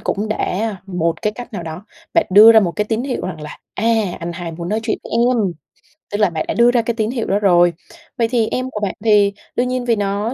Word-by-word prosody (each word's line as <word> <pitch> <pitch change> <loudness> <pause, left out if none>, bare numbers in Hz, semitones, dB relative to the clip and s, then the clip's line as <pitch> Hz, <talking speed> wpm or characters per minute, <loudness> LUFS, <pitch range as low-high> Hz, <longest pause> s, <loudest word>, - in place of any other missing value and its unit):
cũng 210 +2 -2
đã 215 0 -2
một 170 -3 -2
cái 210 - 0
cách 245 +2 -10
nào 185 -5 -5
đó, 160 +4 -8 0.3
bạn 335 - +3
đưa 215 +4 +9
ra 220 - +7
một 175 -5 0
cái 210 - +1
tín 220 +2 -2
hiệu 265 -2 -3
rằng 180 -4 -6
là, 150 0 -9 0.2
à, 210 - -3 0.4
anh 170 +1 -4
hai 170 -1 -6
muốn 170 +1 -6
nói 215 +2 -1
chuyện 225 - -2
với - - -10
em, 240 +1 +2 0.7
tức 205 - -1
là 210 -3 +3
bạn 160 -2 -3
đã - - -1
đưa 235 +1 +4
ra 245 -1 +2
cái 235 +1 -2
tín 220 0 -1
hiệu 235 -4 -3
đó 200 - +1
rồi. 175 -3 +4 0.4
Vậy 230 - +2
thì 230 -2 +1
em 255 +2 -3
của 210 - -4
bạn 205 -2 -2
thì, 205 -2 +4 0.2
đương 250 +1 +1
nhiên 255 -1 -2
vì 235 -2 +2
nó 205 +3 -2
210 Hz, 260 wpm, -18 LUFS, 185-235 Hz, 0.7 s, đưa